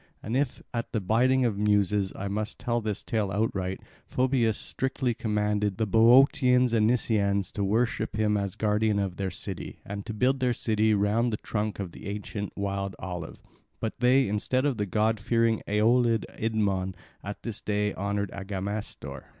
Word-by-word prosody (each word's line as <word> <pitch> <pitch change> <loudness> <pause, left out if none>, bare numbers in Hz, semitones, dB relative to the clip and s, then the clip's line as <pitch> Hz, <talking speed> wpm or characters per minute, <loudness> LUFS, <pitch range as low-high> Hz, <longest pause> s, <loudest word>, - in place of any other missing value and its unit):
And 110 - -3
if 135 -1 -1
at 115 0 -3
the 110 - +1
bidding 125 +6 +3
of 110 -4 0
the 105 - -1
Muses 105 -2 +2
I 100 - -4
must 105 +2 -3
tell 120 0 -1
this 105 -2 -3
tale 105 -4 -1
outright, 95 -2 -1 0.3
Phoebus 125 -4 +1
strictly 130 -2 -2
commanded 105 -2 0
the 110 - +1
Boeotians 125 +3 +5
and 110 -2 +4
Nisaeans 100 -5 +1
to 100 - -2
worship 110 +3 0
him 105 -1 +2
as 100 -2 -2
guardian 105 0 +1
of 95 -3 -2
their 95 -1 -1
city, - - -6
and 100 0 -5
to - - -3
build 130 +4 +2
their 125 -1 +2
city 110 -1 +2
round 105 +4 +2
the 105 - -1
trunk 105 0 -3
of 95 -4 -5
the - - -10
ancient 100 0 -4
wild 100 -1 -2
olive; 90 -3 -7 0.4
but 110 +4 -4
they, 130 +2 +4
instead 125 +6 0
of 140 -5 +1
the 105 -1 -1
god 110 +3 +1
fearing 115 +1 +1
Aeolid 115 +2 +3
Idmon, 100 -4 -1 0.3
at 100 +1 -7
this 115 -3 -5
day 105 0 0
honour 100 +1 -1
Agamestor. 95 -8 -5
105 Hz, 175 wpm, -27 LUFS, 100-115 Hz, 0.4 s, Boeotians